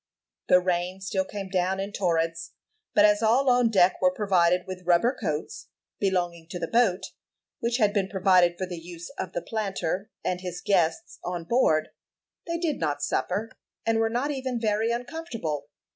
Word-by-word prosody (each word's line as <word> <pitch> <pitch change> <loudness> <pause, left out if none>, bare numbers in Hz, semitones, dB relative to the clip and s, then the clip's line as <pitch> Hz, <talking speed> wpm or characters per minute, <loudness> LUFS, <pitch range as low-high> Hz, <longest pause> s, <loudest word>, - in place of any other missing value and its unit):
The 180 - +7
rain 180 +1 -1
still 190 0 -1
came 195 -1 -6
down 185 0 0
in 195 +1 -3
torrents; 165 -3 -1 0.4
but 205 - +7
as 210 0 +4
all 250 +4 +4
on 245 -1 +4
deck 190 -4 +3
were 275 - +5
provided 180 -8 +2
with 185 -1 -7
rubber 180 +9 +4
coats, 195 - -4 0.3
belonging 175 -4 -1
to 180 - -5
the 170 -1 -3
boat, 195 -5 +1 0.5
which 235 +1 0
had 210 -4 +3
been 195 -2 0
provided 185 -3 +4
for 185 - -2
the 180 -2 -6
use 170 0 -9
of 185 - -4
the 175 - -3
planter 195 -2 -2
and 180 0 -1
his 180 -1 -5
guests 170 -5 0
on 175 -1 -3
board, 165 -7 +2 0.6
they 335 0 -1
did 330 -5 -1
not 145 -3 -1
suffer, 210 +5 -1 0.3
and 225 0 +2
were 225 0 +2
not 250 +6 -1
even 260 -3 -3
very 220 0 +1
uncomfortable. 235 - -4
190 Hz, 175 wpm, -26 LUFS, 175-225 Hz, 0.6 s, The